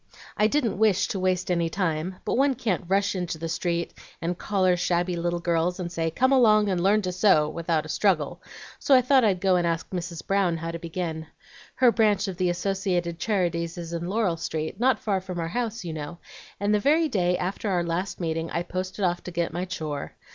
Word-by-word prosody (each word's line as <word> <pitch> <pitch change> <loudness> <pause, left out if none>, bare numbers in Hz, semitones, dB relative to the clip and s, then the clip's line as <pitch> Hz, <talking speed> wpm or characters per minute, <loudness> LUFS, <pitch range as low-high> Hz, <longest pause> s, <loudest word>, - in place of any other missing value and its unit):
I 210 - +3
didn't 240 -6 0
wish 215 -4 +3
to 195 - -2
waste 185 -1 0
any 170 -2 +1
time, 170 0 -2
but - - -1
one 270 +1 +3
can't 215 -8 -1
rush 200 +2 +2
into 180 -4 -3
the 165 +1 -4
street 170 +1 -2 0.3
and 175 +2 -2
collar 185 -1 +1
shabby 175 0 0
little 175 0 -1
girls, 170 +1 0
and 175 -2 -4
say, 165 -1 -1
'Come 260 +11 +2
along 215 -6 +5
and 180 -2 0
learn 205 +3 +3
to 185 - -1
sew,' 180 -5 +4
without 165 0 -1
a - - -9
struggle, 170 -6 +1 0.4
so 275 - +4
I 255 - +5
thought 260 0 +4
I'd 195 -4 +2
go 185 0 +3
and 175 -1 +1
ask 165 0 -1
Mrs. 175 -2 -5
Brown 195 -4 +1
how 165 +1 -4
to 170 - -6
begin. 165 -2 -4 0.5
Her 250 -2 +5
branch 210 -3 +2
of 190 -2 -5
the 180 -1 +1
Associated 180 -2 -1
Charities 175 -4 -1
is 170 -1 -6
in 170 0 -3
Laurel 195 -4 0
Street, 160 0 -4
not 260 +2 +3
far 195 -3 -1
from 180 -2 -6
our 165 0 -2
house, 230 -1 -3
you 165 - -4
know; 155 +2 -6 0.4
and 205 +1 +1
the 210 - +3
very 310 +8 +3
day 180 -8 +1
after 195 +3 -3
our 180 -3 +1
last 170 +3 -3
meeting 165 -1 -2
I 170 - -2
posted 185 +2 -3
off 175 0 -1
to - - -4
get 170 -1 -2
my 175 +2 -2
'chore.' 155 -5 -5
180 Hz, 220 wpm, -26 LUFS, 170-200 Hz, 0.5 s, along